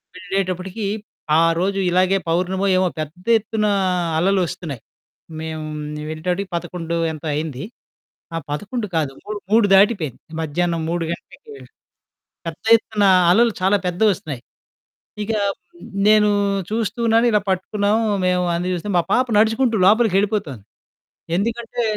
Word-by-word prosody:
వెళ్ళేటప్పటికీ 185 Hz, +2 st, -3 dB, 0.5 s
ఆ -, -, +5 dB, 0.2 s
రోజు 195 Hz, +2 st, 0 dB
ఇలాగే 185 Hz, +2 st, +3 dB
పౌర్ణమో, 185 Hz, +3 st, 0 dB
ఏమో, 185 Hz, 0 st, +3 dB
పెద్ద 155 Hz, +4 st, -6 dB
ఎత్తునా 215 Hz, -1 st, -1 dB, 0.5 s
అలలొస్తున్నాయి. 175 Hz, -, -1 dB, 0.6 s
మేము 160 Hz, -1 st, -5 dB, 0.5 s
వెళ్ళేటప్పటికి 180 Hz, +5 st, -3 dB
11 170 Hz, -1 st, -4 dB, 0.2 s
ఎంతో 160 Hz, 0 st, -7 dB
అయింది. 150 Hz, -3 st, -3 dB, 0.7 s
ఆ! -, -, -1 dB
11 210 Hz, -, -3 dB
కాదు 150 Hz, -4 st, 0 dB
మూడు, 210 Hz, 0 st, -5 dB
మూడు 220 Hz, 0 st, +5 dB
దాటిపోయింది. 195 Hz, -, +3 dB, 0.2 s
మధ్యాహ్నం 165 Hz, +2 st, -1 dB
3 170 Hz, 0 st, -1 dB
గంటలకి 175 Hz, -, -9 dB, 1.0 s
పెద్ద 165 Hz, -1 st, -7 dB
ఎత్తున 215 Hz, -2 st, -2 dB, 0.3 s
అలలు 230 Hz, +5 st, +4 dB
చాలా 190 Hz, +2 st, +3 dB
పెద్దవొస్తున్నాయి. 180 Hz, -, 0 dB, 0.8 s
ఇక 215 Hz, -, -3 dB, 0.8 s
నేనూ 210 Hz, 0 st, +5 dB, 0.4 s
చూస్తున్నాను 230 Hz, +1 st, +1 dB
ఇలా 210 Hz, -1 st, +3 dB
పట్టుకున్నాం 200 Hz, +2 st, 0 dB, 0.3 s
మేము 180 Hz, 0 st, +2 dB
అన్నీ 175 Hz, +1 st, -2 dB
జూస్తే 180 Hz, +3 st, -4 dB
మా -, -, +4 dB
పాప 255 Hz, +1 st, +3 dB
నడుచుకుంటూ 225 Hz, +3 st, +3 dB
లోపలికెళ్ళిపోతుంది. 200 Hz, -, +2 dB, 0.7 s
ఎందుకంటే 235 Hz, +4 st, -2 dB
190 Hz, 110 wpm, -21 LUFS, 170-215 Hz, 1.0 s, ఆ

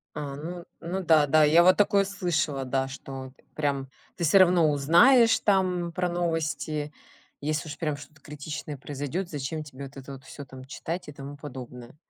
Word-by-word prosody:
А, 145 Hz, -2 st, -5 dB
ну 170 Hz, +4 st, -7 dB, 0.2 s
ну 175 Hz, +3 st, -3 dB
да, 155 Hz, -3 st, +5 dB
да, 155 Hz, +1 st, +5 dB
я 165 Hz, +3 st, +6 dB
вот 185 Hz, +1 st, +6 dB
такое 200 Hz, -1 st, +3 dB
слышала, 165 Hz, -8 st, -1 dB
да, 135 Hz, +1 st, -1 dB
что 135 Hz, -1 st, -8 dB, 0.2 s
прям 140 Hz, -3 st, -1 dB, 0.3 s
ты 170 Hz, -, -2 dB
всё 180 Hz, +6 st, +6 dB
равно 175 Hz, -4 st, +5 dB
узнаешь 225 Hz, -, +5 dB
там 180 Hz, -4 st, +1 dB
про 180 Hz, +1 st, -1 dB
новости, 155 Hz, -3 st, -2 dB, 0.5 s
если 155 Hz, +1 st, -2 dB
уж 145 Hz, -, -7 dB
прям 150 Hz, -3 st, -1 dB
что-то 145 Hz, +1 st, -14 dB
критичное 150 Hz, 0 st, -7 dB
произойдет, 145 Hz, +7 st, -4 dB
зачем 150 Hz, +2 st, -4 dB
тебе 140 Hz, -2 st, -9 dB
вот 140 Hz, +1 st, -11 dB
это 135 Hz, +1 st, -9 dB
вот 135 Hz, 0 st, -11 dB
всё 145 Hz, -, -9 dB
там 130 Hz, -1 st, -12 dB
читать 165 Hz, +5 st, -6 dB
и -, -, -7 dB
тому 140 Hz, 0 st, -9 dB
подобное? 125 Hz, -3 st, -9 dB
150 Hz, 180 wpm, -27 LUFS, 140-175 Hz, 0.5 s, я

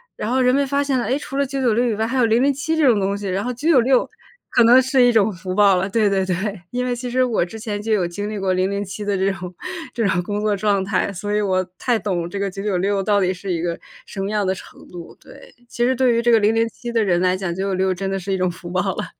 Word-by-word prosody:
然 215 Hz, -, -4 dB
后 260 Hz, +1 st, +1 dB
人 250 Hz, 0 st, +3 dB
们 280 Hz, 0 st, +2 dB
发 280 Hz, +1 st, +1 dB
现 270 Hz, -3 st, 0 dB
了， -, -, -2 dB
哎， 265 Hz, -, 0 dB
除 275 Hz, -1 st, -6 dB
了 280 Hz, -, +2 dB
996 250 Hz, -3 st, 0 dB
以 225 Hz, -, 0 dB
外， 220 Hz, +1 st, -1 dB
还 260 Hz, +3 st, -2 dB
有 240 Hz, -, +4 dB
007 275 Hz, +7 st, +1 dB
这 305 Hz, -, +3 dB
种 220 Hz, -4 st, +4 dB
东 200 Hz, +1 st, -1 dB
西。 200 Hz, -1 st, -5 dB
然 190 Hz, +2 st, -1 dB
后 250 Hz, -, -2 dB
996 260 Hz, -2 st, +3 dB, 0.4 s
可 240 Hz, -, +4 dB
能 245 Hz, +3 st, +7 dB
是 260 Hz, -1 st, +3 dB
一 245 Hz, -, +5 dB
种 215 Hz, -1 st, +3 dB
福 185 Hz, +1 st, -6 dB
报 200 Hz, -2 st, +5 dB
了， 190 Hz, +2 st, -1 dB
对 215 Hz, 0 st, +2 dB
对 195 Hz, -1 st, +1 dB
对。 185 Hz, -2 st, -1 dB, 0.4 s
因 250 Hz, 0 st, -2 dB
为 245 Hz, -1 st, -1 dB
其 245 Hz, 0 st, -5 dB
实 255 Hz, +1 st, +2 dB
我 230 Hz, -8 st, +1 dB
之 220 Hz, +5 st, -10 dB
前 210 Hz, -2 st, -4 dB
就 220 Hz, +1 st, -3 dB
有 185 Hz, -4 st, +2 dB
经 205 Hz, +4 st, -5 dB
历 215 Hz, -, -4 dB
过 195 Hz, -1 st, 0 dB
007 200 Hz, +2 st, -2 dB
的 200 Hz, -1 st, 0 dB
这 195 Hz, +1 st, +1 dB
种 180 Hz, -1 st, -7 dB, 0.4 s
这 225 Hz, -4 st, 0 dB
种 180 Hz, -1 st, +1 dB
工 205 Hz, +2 st, -3 dB
作 210 Hz, -1 st, +1 dB
状 200 Hz, -2 st, +1 dB
态。 200 Hz, 0 st, 0 dB
所 205 Hz, +3 st, -5 dB
以 210 Hz, -, +2 dB
我 185 Hz, -2 st, 0 dB
太 245 Hz, -3 st, +1 dB
懂 175 Hz, -4 st, -2 dB
这 200 Hz, -, -6 dB
个 200 Hz, -1 st, -2 dB
996 195 Hz, 0 st, -1 dB
到 205 Hz, 0 st, +2 dB
底 185 Hz, 0 st, +1 dB
是 185 Hz, +1 st, -6 dB
一 165 Hz, -, -2 dB
个 170 Hz, -1 st, -3 dB, 0.3 s
什 195 Hz, -, -6 dB
么 195 Hz, -, -2 dB
样 210 Hz, -2 st, 0 dB
的 190 Hz, -, +1 dB
程 -, -, -14 dB
度。 175 Hz, -2 st, -10 dB
对， -, -, -16 dB, 0.2 s
其 240 Hz, -, -2 dB
实 260 Hz, +1 st, +2 dB
对 250 Hz, -1 st, +3 dB
于 235 Hz, -, +2 dB
这 240 Hz, 0 st, +2 dB
个 225 Hz, -, +6 dB
007 225 Hz, +3 st, 0 dB
的 230 Hz, -1 st, +2 dB
人 175 Hz, -4 st, +2 dB
来 185 Hz, 0 st, +2 dB
讲， 185 Hz, -3 st, -3 dB
996 190 Hz, -1 st, 0 dB
真 195 Hz, +1 st, -4 dB
的 195 Hz, -, -1 dB
是 195 Hz, +2 st, -5 dB
一 -, -, 0 dB
种 185 Hz, 0 st, +1 dB
福 175 Hz, 0 st, -10 dB
报 180 Hz, +1 st, 0 dB
了。 -, -, -3 dB
205 Hz, 280 characters per minute, -21 LUFS, 190-240 Hz, 0.4 s, 能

